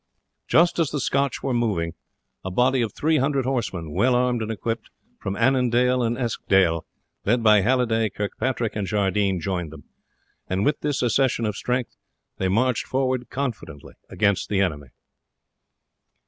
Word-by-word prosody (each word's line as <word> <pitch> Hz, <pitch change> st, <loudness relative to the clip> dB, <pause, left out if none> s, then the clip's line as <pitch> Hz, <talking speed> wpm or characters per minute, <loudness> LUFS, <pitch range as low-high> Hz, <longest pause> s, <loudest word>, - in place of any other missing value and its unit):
Just 170 Hz, +1 st, +3 dB
as 160 Hz, -4 st, +2 dB
the 150 Hz, -, -3 dB
Scotch 140 Hz, +1 st, 0 dB
were 135 Hz, -, -1 dB
moving, 100 Hz, -9 st, 0 dB, 0.5 s
a 95 Hz, -, -3 dB
body 125 Hz, +7 st, +2 dB
of 115 Hz, -3 st, -1 dB
300 140 Hz, -2 st, +1 dB
horsemen, 105 Hz, -, -2 dB
well 125 Hz, +10 st, +2 dB
armed 125 Hz, -1 st, +1 dB
and 110 Hz, -, -3 dB
equipped, 115 Hz, +1 st, -3 dB, 0.3 s
from 95 Hz, -, -4 dB
Annandale 125 Hz, 0 st, +2 dB
and 120 Hz, 0 st, 0 dB
Eskdale, 95 Hz, -9 st, +1 dB, 0.4 s
led 120 Hz, +3 st, +1 dB
by 105 Hz, -2 st, +6 dB
Halliday, 115 Hz, -1 st, +2 dB
Kirkpatrick, 110 Hz, +3 st, -2 dB
and 105 Hz, -2 st, -2 dB
Jardine, 100 Hz, -2 st, +1 dB
joined 90 Hz, -3 st, -3 dB
them; 80 Hz, -3 st, -12 dB, 0.6 s
and 95 Hz, +2 st, -1 dB
with 150 Hz, -, +1 dB
this 145 Hz, -3 st, -1 dB
accession 125 Hz, -1 st, +2 dB
of 105 Hz, -2 st, -2 dB
strength 125 Hz, +2 st, -2 dB, 0.4 s
they 95 Hz, -, +1 dB
marched 115 Hz, +5 st, +1 dB
forward 130 Hz, -2 st, -1 dB
confidently 115 Hz, -, -5 dB, 0.2 s
against 100 Hz, -2 st, 0 dB
the 100 Hz, -, +1 dB
enemy. 75 Hz, -8 st, -1 dB
115 Hz, 145 wpm, -24 LUFS, 100-130 Hz, 0.6 s, by